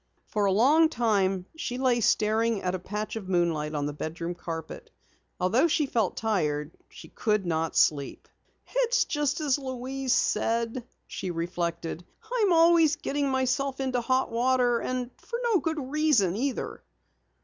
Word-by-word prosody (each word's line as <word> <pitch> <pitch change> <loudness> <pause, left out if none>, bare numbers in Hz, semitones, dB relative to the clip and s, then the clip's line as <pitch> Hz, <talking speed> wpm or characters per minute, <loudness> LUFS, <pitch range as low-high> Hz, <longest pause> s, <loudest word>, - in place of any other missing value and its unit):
For 210 -1 -1
a 195 - +3
long 290 +11 +5
while 195 -5 +1
she 260 -6 -4
lay 255 -2 +2
staring 220 0 +2
at 180 0 -1
a 185 - -2
patch 210 +5 -5
of 200 -4 -6
moonlight 165 -4 0
on 145 -1 -1
the 145 - -3
bedroom 165 +3 -4
carpet. 165 -2 -7 0.5
Although 220 - +3
she 305 -1 +1
felt 225 -8 -1
tired 155 -9 -1 0.2
she - - -12
could 210 -4 0
not 165 -1 -1
sleep. 140 -3 +1 0.4
"It's - - +1
just 295 0 -1
as 290 -2 +1
Louise 260 0 -2
said," 230 +2 0 0.2
she 185 - -5
reflected. 170 0 -3 0.3
"I'm 425 -6 +3
always 330 -2 +5
getting 285 0 -2
myself 265 +1 0
into 260 -2 0
hot 255 +2 0
water 245 0 +2
and 250 0 -3
for 470 - -5
no 455 -6 +3
good 320 -1 -2
reason, 295 - +2
either!" 260 +4 -3
235 Hz, 150 wpm, -27 LUFS, 180-275 Hz, 0.5 s, long